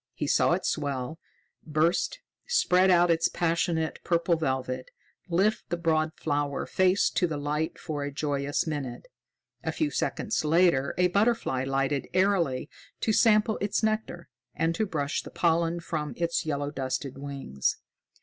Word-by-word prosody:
He 150 - -2
saw 145 - +3
it 185 - -1
swell, 145 +1 -2 0.4
burst, 165 - 0 0.3
spread 190 - +4
out 175 -1 +5
its 165 0 +3
passionate 165 -1 0
purple 170 0 +2
velvet, 130 -4 -2 0.4
lift 195 +5 +1
the 175 - -1
broad 160 -2 +1
flower 145 -2 -1
face 185 +1 +3
to 180 - +1
the 155 -3 -3
light 150 +2 -2
for 150 -4 -4
a 145 - -3
joyous 145 0 -1
minute. 145 -6 -4 0.6
A - - -1
few 310 -2 -1
seconds 215 - -1
later 155 -3 +3
a 180 0 +3
butterfly 200 - +1
lighted 135 +1 0
airily 185 -9 +2 0.3
to 220 - +1
sample 215 0 +4
its 205 +2 0
nectar 215 -6 -1 0.3
and 165 +2 +1
to 215 +5 -1
brush 145 -5 -1
the - - -10
pollen 170 0 +1
from 155 -3 -4
its 170 -1 -1
yellow 145 -1 -1
dusted 135 -1 -3
wings. 135 - -2
160 Hz, 150 wpm, -27 LUFS, 145-180 Hz, 0.6 s, out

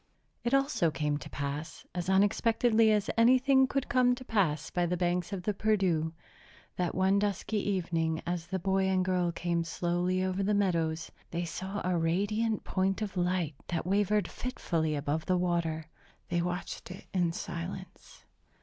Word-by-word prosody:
It 240 +3 +2
also 275 - +2
came 150 0 -1
to - - -9
pass, 145 +2 -5
as 175 0 -3
unexpectedly 220 +3 +4
as 210 -1 +1
anything 260 +3 +5
could 275 0 -1
come 250 0 +3
to 255 0 -10
pass 160 - 0
by 175 -1 +1
the 180 +1 -1
banks 175 +1 0
of 190 -3 -4
the 210 - 0
Perdu, 190 -7 +1 0.6
that 180 -2 -1
one 190 +2 +3
dusky 205 +1 -1
evening, 165 -5 0
as 175 -1 -3
the 190 - -2
boy 190 +1 +1
and 185 -1 +2
girl 180 -2 +1
came 170 0 -1
slowly 175 +2 0
over 185 +1 -1
the 205 +2 +2
meadows, 165 -5 0 0.2
they 170 +1 -2
saw 190 +4 -4
a 180 -2 +1
radiant 205 +6 0
point 195 +2 0
of 200 -2 -5
light 180 -3 0
that 170 -2 -2
wavered 205 +2 +2
fitfully 165 -11 -2
above 150 +2 -2
the 185 - +3
water. 170 -3 0 0.4
They 175 - +1
watched 180 +2 -4
it 185 +2 -9
in 175 -3 +2
silence. 170 +3 -7
185 Hz, 165 wpm, -30 LUFS, 170-205 Hz, 0.6 s, anything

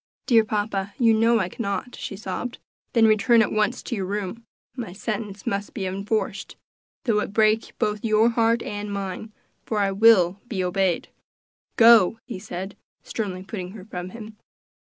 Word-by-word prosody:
"Dear 230 -4 +5
papa, 205 -2 -2
you 230 -2 +4
know 230 +2 +4
I 190 -5 0
cannot," 200 +5 -4
she 195 - -6
sobbed. 215 +5 -5 0.4
"Then 230 -2 +5
return 220 +2 +5
at - - -2
once 215 +3 0
to 240 - -3
your 190 -3 -3
room; 205 +3 -4 0.3
my 230 -8 -6
sentence 210 -1 -5
must 200 +1 -3
be 195 - -3
enforced, 200 +4 -3 0.5
though 220 -4 +2
it 205 - -4
break 215 +1 +2
both 210 0 -1
your 220 +1 +4
heart 230 0 +2
and 205 0 -5
mine, 200 +2 -5 0.3
for 220 - -3
I 200 -1 +2
will 195 -3 +5
be 195 -6 -2
obeyed. 180 -1 0 0.7
Go!" 225 -3 +7
he 235 -7 -6
said, 190 -1 -6 0.3
sternly 190 -5 -4
putting 190 -2 -6
her 200 -4 -10
from 180 -3 -6
him. 215 +1 -10
210 Hz, 165 wpm, -24 LUFS, 195-225 Hz, 0.7 s, Go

